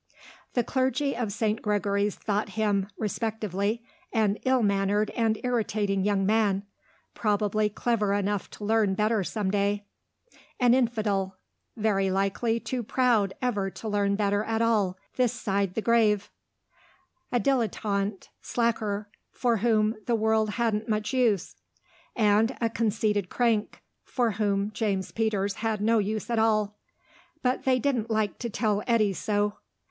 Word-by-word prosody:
The 245 Hz, -, +2 dB
clergy 260 Hz, +3 st, 0 dB
of 230 Hz, -3 st, -2 dB
St. 215 Hz, +2 st, -1 dB
Gregory's 205 Hz, -1 st, 0 dB
thought 210 Hz, 0 st, -2 dB
him 205 Hz, -3 st, +1 dB
(respectively) 215 Hz, 0 st, -2 dB, 0.3 s
an 215 Hz, -3 st, +2 dB
ill 260 Hz, -2 st, +3 dB
mannered 200 Hz, +1 st, +1 dB
and 225 Hz, -2 st, +1 dB
irritating 210 Hz, -5 st, 0 dB
young 200 Hz, -1 st, +1 dB
man, 205 Hz, -2 st, +2 dB, 0.5 s
probably 210 Hz, 0 st, +1 dB
clever 210 Hz, -1 st, 0 dB
enough 200 Hz, -1 st, -1 dB
to 205 Hz, -, -6 dB
learn 215 Hz, -3 st, +2 dB
better 215 Hz, 0 st, +1 dB
some 200 Hz, 0 st, -2 dB
day; 205 Hz, 0 st, 0 dB, 0.7 s
an 245 Hz, -2 st, +5 dB
infidel, 210 Hz, -6 st, 0 dB, 0.4 s
very 200 Hz, -3 st, +1 dB
likely 195 Hz, +5 st, 0 dB
too 250 Hz, +1 st, -3 dB
proud 230 Hz, -4 st, +1 dB
ever 205 Hz, -6 st, 0 dB
to 220 Hz, -, -8 dB
learn 200 Hz, -1 st, +1 dB
better 205 Hz, 0 st, +1 dB
at 225 Hz, 0 st, -1 dB
all, 210 Hz, -5 st, +2 dB, 0.2 s
this 250 Hz, -2 st, +2 dB
side 200 Hz, -5 st, -1 dB
the 225 Hz, -, -1 dB
grave; 215 Hz, -3 st, +2 dB, 1.0 s
a 245 Hz, -, +2 dB
dilettante 210 Hz, -6 st, -1 dB
slacker, 215 Hz, -3 st, -1 dB, 0.2 s
for 240 Hz, -2 st, 0 dB
whom 215 Hz, 0 st, +2 dB
the 240 Hz, -, +2 dB
world 220 Hz, -1 st, +2 dB
hadn't 225 Hz, -2 st, 0 dB
much 215 Hz, +2 st, -1 dB
use; 230 Hz, -8 st, +1 dB, 0.6 s
and 220 Hz, +2 st, +3 dB
a 230 Hz, -1 st, 0 dB
conceited 210 Hz, -4 st, 0 dB
crank, 230 Hz, -4 st, 0 dB, 0.2 s
for 240 Hz, -3 st, 0 dB
whom 205 Hz, 0 st, 0 dB
James 200 Hz, -4 st, -1 dB
Peters 205 Hz, -3 st, -1 dB
had 220 Hz, -2 st, -1 dB
no 225 Hz, +2 st, +3 dB
use 215 Hz, +1 st, -2 dB
at 230 Hz, -, +2 dB
all. 215 Hz, -2 st, +1 dB, 0.6 s
But 250 Hz, 0 st, 0 dB
they 260 Hz, -1 st, +4 dB
didn't 250 Hz, -3 st, 0 dB
like 215 Hz, -2 st, 0 dB
to 235 Hz, -, -3 dB
tell 210 Hz, -1 st, 0 dB
Eddy 220 Hz, -4 st, +3 dB
so. 205 Hz, +1 st, -1 dB
215 Hz, 140 wpm, -27 LUFS, 200-230 Hz, 1.0 s, an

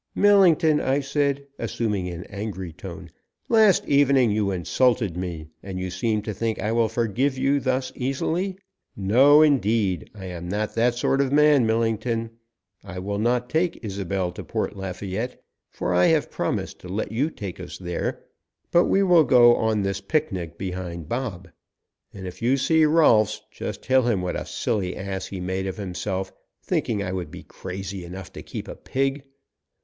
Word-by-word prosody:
"Millington," 175 Hz, -7 st, +5 dB
I 135 Hz, +2 st, +1 dB
said, 140 Hz, 0 st, -1 dB
assuming 105 Hz, -5 st, -2 dB
an 85 Hz, -1 st, -6 dB
angry 100 Hz, -4 st, -6 dB
tone, 90 Hz, -1 st, -9 dB, 0.4 s
"last 220 Hz, -5 st, +5 dB
evening 140 Hz, -4 st, +4 dB
you 105 Hz, -1 st, +1 dB
insulted 100 Hz, +2 st, +1 dB
me, 90 Hz, -3 st, -4 dB, 0.2 s
and 95 Hz, -1 st, -6 dB
you 90 Hz, 0 st, -3 dB
seem 105 Hz, +3 st, -1 dB
to 105 Hz, -, -4 dB
think 110 Hz, +2 st, -2 dB
I 105 Hz, -, -1 dB
will 115 Hz, -1 st, +2 dB
forgive 120 Hz, +4 st, 0 dB
you 135 Hz, +2 st, +2 dB
thus 130 Hz, 0 st, -1 dB
easily. 165 Hz, +9 st, -2 dB, 0.4 s
No 130 Hz, +10 st, +6 dB
indeed! 110 Hz, -, +1 dB
I 95 Hz, -2 st, -8 dB
am 90 Hz, -1 st, -6 dB
not 105 Hz, +2 st, -2 dB
that 120 Hz, +1 st, +2 dB
sort 135 Hz, +3 st, +1 dB
of 135 Hz, -1 st, 0 dB
man, 145 Hz, -4 st, +5 dB
Millington. 115 Hz, 0 st, 0 dB, 0.5 s
I 95 Hz, -2 st, -8 dB
will 100 Hz, +2 st, -3 dB
not 120 Hz, +2 st, +1 dB
take 160 Hz, -3 st, -1 dB
Isobel 95 Hz, -2 st, -2 dB
to 90 Hz, -, -8 dB
Port -, -, -3 dB
Lafayette, 95 Hz, +5 st, -4 dB, 0.3 s
for 90 Hz, -, -2 dB
I 90 Hz, 0 st, +5 dB
have 160 Hz, -2 st, +2 dB
promised -, -, -3 dB
to 90 Hz, -, -11 dB
let 100 Hz, +2 st, -3 dB
you 130 Hz, +8 st, 0 dB
take 100 Hz, -, -7 dB
us 90 Hz, -, -7 dB
there, 90 Hz, -2 st, -4 dB, 0.5 s
but 175 Hz, -, +5 dB
we 195 Hz, -, +3 dB
will 175 Hz, -4 st, +6 dB
go 120 Hz, -3 st, +6 dB
on 110 Hz, -2 st, +1 dB
this 100 Hz, 0 st, -2 dB
picnic 95 Hz, -, -2 dB
behind 90 Hz, -4 st, -5 dB
Bob. 115 Hz, -8 st, -3 dB, 0.6 s
And 95 Hz, -1 st, -9 dB
if 90 Hz, -1 st, -8 dB
you 125 Hz, +4 st, +3 dB
see 160 Hz, +3 st, +3 dB
Rolfs 115 Hz, -10 st, +4 dB
just -, -, -6 dB
tell 130 Hz, 0 st, +4 dB
him 100 Hz, -6 st, +1 dB
what 90 Hz, -, -2 dB
a -, -, -4 dB
silly 100 Hz, -6 st, -2 dB
ass 95 Hz, 0 st, -4 dB
he 95 Hz, -, -6 dB
made 95 Hz, +1 st, -2 dB
of 95 Hz, -, -4 dB
himself, 95 Hz, 0 st, -4 dB, 0.3 s
thinking 105 Hz, -3 st, -1 dB
I 90 Hz, -, -3 dB
would 90 Hz, -2 st, -4 dB
be -, -, -10 dB
crazy 95 Hz, 0 st, -7 dB
enough 90 Hz, +1 st, -9 dB
to -, -, -8 dB
keep -, -, -7 dB
a -, -, -6 dB
pig. 135 Hz, +1 st, -2 dB
110 Hz, 175 wpm, -24 LUFS, 95-135 Hz, 0.6 s, No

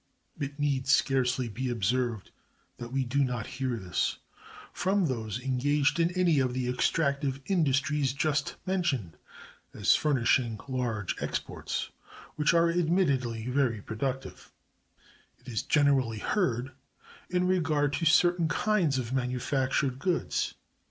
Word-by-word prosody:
It 140 Hz, 0 st, -4 dB
need 140 Hz, -3 st, 0 dB
scarcely 130 Hz, -2 st, +2 dB
be 125 Hz, +4 st, -3 dB
observed 120 Hz, 0 st, -1 dB, 0.5 s
that 120 Hz, 0 st, -7 dB
we 135 Hz, 0 st, 0 dB
do 140 Hz, +4 st, +1 dB
not 125 Hz, -4 st, -2 dB
hear 130 Hz, -1 st, -3 dB
this 95 Hz, -4 st, -1 dB, 0.6 s
from 190 Hz, 0 st, +1 dB
those 115 Hz, -5 st, -3 dB
engaged 140 Hz, +4 st, +1 dB
in 165 Hz, 0 st, +3 dB
any 170 Hz, -5 st, +3 dB
of 130 Hz, -2 st, 0 dB
the 130 Hz, -1 st, -1 dB
extractive 140 Hz, +1 st, 0 dB
industries 145 Hz, -5 st, +1 dB
just 145 Hz, +1 st, -1 dB
mentioned 155 Hz, -, -1 dB, 0.6 s
as -, -, +4 dB
furnishing 120 Hz, -5 st, +2 dB
large 120 Hz, -6 st, -2 dB
exports, -, -, -3 dB, 0.4 s
which 150 Hz, -1 st, +3 dB
are 170 Hz, 0 st, +4 dB
admittedly 140 Hz, -10 st, +1 dB
very 125 Hz, -3 st, +1 dB
productive; 130 Hz, +6 st, -5 dB, 0.9 s
it 125 Hz, -, -25 dB
is 115 Hz, -4 st, -2 dB
generally 135 Hz, -6 st, +2 dB
heard 130 Hz, -, -1 dB, 0.6 s
in 180 Hz, 0 st, +1 dB
regard 160 Hz, -6 st, +1 dB
to 165 Hz, -, -1 dB
certain 175 Hz, +1 st, +4 dB
kinds 175 Hz, -6 st, +1 dB
of 125 Hz, -1 st, -3 dB
manufactured 130 Hz, +1 st, 0 dB
goods. 180 Hz, +3 st, -1 dB
135 Hz, 125 wpm, -29 LUFS, 125-155 Hz, 0.9 s, as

